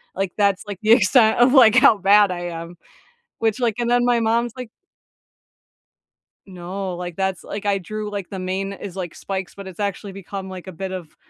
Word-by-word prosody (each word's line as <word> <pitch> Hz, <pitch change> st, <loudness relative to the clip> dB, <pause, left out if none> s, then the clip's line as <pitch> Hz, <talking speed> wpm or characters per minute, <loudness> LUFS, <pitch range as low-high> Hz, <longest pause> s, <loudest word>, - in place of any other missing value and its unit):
like, 195 Hz, -1 st, -2 dB
that's, 200 Hz, -2 st, +2 dB
like, 200 Hz, -3 st, -6 dB
the 215 Hz, +1 st, +2 dB
extent 230 Hz, 0 st, +5 dB
of, 250 Hz, +2 st, +5 dB
like, 240 Hz, -4 st, +7 dB
how 235 Hz, -4 st, +6 dB
bad 200 Hz, +1 st, +5 dB
I 175 Hz, -1 st, -4 dB
am. 170 Hz, +1 st, -8 dB, 0.7 s
Which, 225 Hz, +2 st, 0 dB
like, 230 Hz, -3 st, 0 dB
and 235 Hz, 0 st, -1 dB
then 245 Hz, 0 st, +3 dB
my 245 Hz, -1 st, +3 dB
mom's 230 Hz, +1 st, 0 dB
like 250 Hz, -3 st, -7 dB, 1.8 s
No, 185 Hz, 0 st, -6 dB
like, 175 Hz, -1 st, -6 dB
that's 190 Hz, -2 st, -2 dB
like, 205 Hz, 0 st, -7 dB
I 200 Hz, -1 st, +1 dB
drew, 215 Hz, +3 st, -6 dB
like, 200 Hz, -3 st, -5 dB
the 195 Hz, -, -6 dB
main 190 Hz, +2 st, -3 dB
is 195 Hz, -1 st, -9 dB
like, 175 Hz, -3 st, -6 dB
spikes, 190 Hz, -3 st, -5 dB
but 200 Hz, -1 st, -9 dB
it's 190 Hz, +1 st, -11 dB
actually 200 Hz, 0 st, -3 dB
become 195 Hz, 0 st, -7 dB
like 185 Hz, 0 st, -9 dB
a -, -, -6 dB
bit 190 Hz, +2 st, -6 dB
of, 180 Hz, -4 st, -8 dB
195 Hz, 200 wpm, -21 LUFS, 185-220 Hz, 1.8 s, like